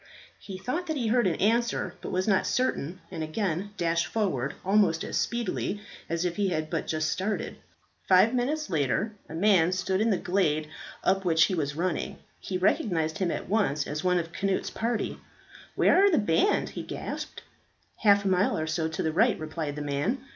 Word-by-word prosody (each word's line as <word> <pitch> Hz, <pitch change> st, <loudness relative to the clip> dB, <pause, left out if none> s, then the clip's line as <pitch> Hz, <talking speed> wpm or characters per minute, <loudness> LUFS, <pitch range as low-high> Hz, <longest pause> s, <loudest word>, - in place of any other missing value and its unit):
He 190 Hz, -2 st, -8 dB
thought 305 Hz, -, -3 dB
that 315 Hz, -2 st, -1 dB
he 235 Hz, -4 st, 0 dB
heard 240 Hz, -2 st, +3 dB
an 170 Hz, -, +1 dB
answer, 235 Hz, +4 st, +1 dB
but -, -, -5 dB
was 185 Hz, +2 st, 0 dB
not 195 Hz, -3 st, +3 dB
certain, 185 Hz, -, -1 dB
and -, -, -5 dB
again 180 Hz, +3 st, -2 dB
dashed 170 Hz, -1 st, +1 dB
forward, 150 Hz, -, -1 dB
almost 190 Hz, -5 st, +3 dB
as -, -, -4 dB
speedily 230 Hz, -3 st, -1 dB, 0.3 s
as 170 Hz, +1 st, -1 dB
if 175 Hz, -1 st, -2 dB
he 205 Hz, -1 st, +2 dB
had 155 Hz, -3 st, -2 dB
but -, -, -2 dB
just 155 Hz, -1 st, 0 dB
started. 205 Hz, +3 st, -2 dB, 0.5 s
Five 190 Hz, +5 st, +5 dB
minutes 290 Hz, +5 st, 0 dB
later 150 Hz, -, 0 dB, 0.2 s
a 160 Hz, -, -6 dB
man 180 Hz, -2 st, +4 dB
stood 185 Hz, +1 st, 0 dB
in 225 Hz, -, +3 dB
the 195 Hz, -, +2 dB
glade 155 Hz, -5 st, 0 dB, 0.4 s
up 190 Hz, 0 st, +2 dB
which 165 Hz, -2 st, +4 dB
he 190 Hz, -, +1 dB
was 150 Hz, -4 st, -1 dB
running. 170 Hz, 0 st, -2 dB, 0.2 s
He 185 Hz, -, -3 dB
recognized 165 Hz, -4 st, +1 dB
him 185 Hz, -3 st, +1 dB
at -, -, -3 dB
once 190 Hz, -8 st, +1 dB
as 150 Hz, +1 st, -4 dB
one 180 Hz, -1 st, +3 dB
of 165 Hz, -1 st, -3 dB
Cnut's 195 Hz, -1 st, -1 dB
party. 230 Hz, -1 st, -2 dB, 0.6 s
"Where 385 Hz, -, +5 dB
are 405 Hz, -, +6 dB
the 335 Hz, -, +3 dB
band?" 205 Hz, -, +2 dB
he -, -, -6 dB
gasped. -, -, -6 dB, 0.5 s
"Half 200 Hz, -2 st, +4 dB
a -, -, +2 dB
mile 185 Hz, +1 st, +2 dB
or 155 Hz, -, -1 dB
so 160 Hz, 0 st, -1 dB
to 160 Hz, -, -3 dB
the 160 Hz, -, 0 dB
right," 225 Hz, +7 st, +3 dB
replied 155 Hz, -1 st, -4 dB
the 150 Hz, -, -4 dB
man. 145 Hz, -, -1 dB
185 Hz, 195 wpm, -27 LUFS, 160-210 Hz, 0.6 s, are